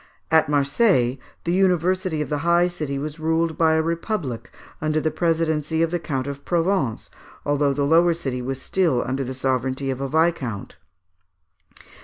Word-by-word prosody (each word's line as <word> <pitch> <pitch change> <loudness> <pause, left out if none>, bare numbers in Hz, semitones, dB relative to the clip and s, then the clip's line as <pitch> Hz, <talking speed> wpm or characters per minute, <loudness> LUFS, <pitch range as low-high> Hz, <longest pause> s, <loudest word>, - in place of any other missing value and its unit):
At 160 -2 +4
Marseilles, 140 - +2 0.2
the 170 - 0
University 185 -3 +1
of - - -9
the 150 -1 -1
high 170 +3 +3
city 155 -6 -3
was 150 +2 -5
ruled 160 0 0
by 160 0 +3
a 160 0 +2
republic 165 - -3 0.3
under 155 0 +1
the 155 0 0
presidency 160 -1 0
of 165 - 0
the 175 - 0
Count 135 -6 -3
of 140 0 -6
Provence, 170 - 0 0.3
although 145 0 +2
the 140 +1 0
lower 165 +3 +4
city 135 -6 -4
was 130 +1 -4
still 160 -4 +1
under 130 +2 -2
the 130 0 -5
sovereignty 130 +1 -1
of 130 0 -5
a 135 - -2
viscount. 155 - -1
155 Hz, 165 wpm, -23 LUFS, 135-170 Hz, 0.3 s, At